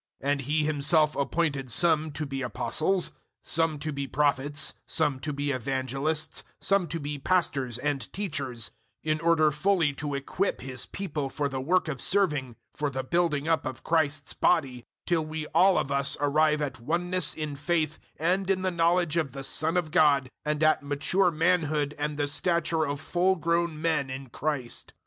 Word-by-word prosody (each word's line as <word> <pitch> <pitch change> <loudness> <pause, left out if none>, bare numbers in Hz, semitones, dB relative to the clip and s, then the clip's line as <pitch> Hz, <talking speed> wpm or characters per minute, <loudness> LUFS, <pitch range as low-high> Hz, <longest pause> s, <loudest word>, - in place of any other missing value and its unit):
004:011 140 - +1
And 145 -1 0
He 150 +3 0
Himself 150 +1 +3
appointed 140 -2 -1
some 160 +2 +3
to 150 +1 -3
be 135 -1 -4
Apostles, 155 - +1 0.3
some 165 -1 +1
to 155 +2 -4
be 140 0 -3
Prophets, 145 0 +1
some 150 -4 0
to 150 +3 -3
be 145 0 -2
evangelists, 135 +4 -1 0.2
some 195 -3 +2
to 165 +2 -4
be 145 -1 -4
pastors 135 -7 +1
and 145 +1 -2
teachers, 140 - -3 0.3
004:012 155 - +1
in 155 - 0
order 165 -2 +3
fully 160 0 +2
to 145 0 -4
equip 160 +8 -2
His 130 -1 -3
people 150 -8 -4
for 145 +1 -1
the 135 -1 -4
work 175 +6 +2
of 135 -5 -4
serving 150 - +2 0.2
for 150 -1 -2
the 130 -1 -4
building 160 0 0
up 165 -1 +2
of 130 - -6
Christ's 155 -2 +1
body 135 -8 +2 0.2
004:013 - - -66
till 165 -3 +1
we 155 0 -4
all 190 0 +5
of 140 - -1
us 140 0 +1
arrive 150 +1 +2
at 130 -3 -4
oneness 175 +5 -1
in 155 -2 -4
faith 155 +1 -1 0.2
and 185 +4 0
in 190 -1 +1
the 185 - +1
knowledge 170 -1 +2
of 150 -6 -1
the 135 - -6
Son 155 +5 +1
of 165 -4 -1
God, 140 -5 +3
and 150 +1 -1
at 155 0 +4
mature 145 +7 +1
manhood 155 -3 +1
and 150 0 -2
the 145 -1 0
stature 160 +1 +1
of 140 0 -3
full 180 +4 +1
grown 170 -1 0
men 160 -4 0
in 130 0 -7
Christ. 145 -5 -4
150 Hz, 180 wpm, -27 LUFS, 140-165 Hz, 0.3 s, all